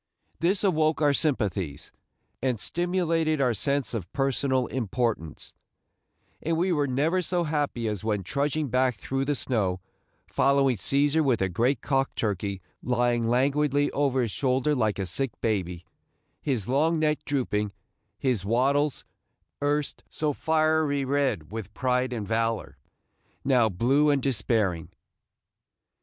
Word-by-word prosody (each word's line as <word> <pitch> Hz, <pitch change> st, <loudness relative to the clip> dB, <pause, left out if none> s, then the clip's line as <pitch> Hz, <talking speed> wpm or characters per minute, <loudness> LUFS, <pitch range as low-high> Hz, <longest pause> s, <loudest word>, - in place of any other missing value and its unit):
This 185 Hz, +5 st, +1 dB
awoke 160 Hz, -5 st, +2 dB
our 145 Hz, -2 st, +3 dB
sympathies, 100 Hz, -, -1 dB, 0.5 s
and 125 Hz, -4 st, 0 dB
stimulated 165 Hz, -, 0 dB
our 125 Hz, -3 st, +2 dB
sense 140 Hz, +5 st, -1 dB
of 95 Hz, -7 st, -4 dB
personal 135 Hz, -1 st, +1 dB
importance, 115 Hz, -, -2 dB, 0.9 s
and 165 Hz, 0 st, 0 dB
we 180 Hz, +3 st, +1 dB
were 145 Hz, -4 st, +1 dB
never 150 Hz, +8 st, +1 dB
so 175 Hz, 0 st, 0 dB
happy 145 Hz, -7 st, -1 dB
as 105 Hz, -3 st, -3 dB
when 105 Hz, -3 st, -1 dB
trudging 145 Hz, -, -1 dB
back 125 Hz, 0 st, +2 dB
through 135 Hz, +7 st, -2 dB
the 145 Hz, +1 st, 0 dB
snow, 100 Hz, -9 st, -1 dB, 0.5 s
following 135 Hz, -2 st, +2 dB
Cæsar 145 Hz, -, +2 dB
with 130 Hz, -5 st, +2 dB
a 95 Hz, -, +1 dB
great 120 Hz, +8 st, +1 dB
cock 135 Hz, -1 st, 0 dB
turkey 100 Hz, -3 st, -2 dB, 0.2 s
lying 120 Hz, -1 st, +1 dB
languidly 140 Hz, +3 st, +2 dB
over 135 Hz, -3 st, +1 dB
his 115 Hz, -, -2 dB
shoulder 130 Hz, +4 st, +1 dB
like 110 Hz, -6 st, +1 dB
a 95 Hz, -, -2 dB
sick 120 Hz, +7 st, -3 dB
baby, 90 Hz, -6 st, -2 dB, 0.6 s
his 125 Hz, -9 st, -1 dB
long 155 Hz, +6 st, +2 dB
neck 155 Hz, -1 st, 0 dB
drooping, 105 Hz, -7 st, -1 dB, 0.5 s
his 125 Hz, -8 st, 0 dB
wattles, 135 Hz, +7 st, +1 dB, 0.6 s
erst 145 Hz, 0 st, -1 dB
so 150 Hz, -1 st, -1 dB
fiery 155 Hz, -2 st, +1 dB
red 130 Hz, -, 0 dB
with 110 Hz, -3 st, -7 dB
pride 125 Hz, -1 st, 0 dB
and 110 Hz, -5 st, -4 dB
valor, 115 Hz, 0 st, -1 dB, 0.7 s
now 125 Hz, -5 st, +4 dB
blue 130 Hz, +10 st, +2 dB
and 140 Hz, -3 st, +2 dB
despairing. 105 Hz, -, 0 dB
130 Hz, 135 wpm, -26 LUFS, 110-145 Hz, 0.9 s, now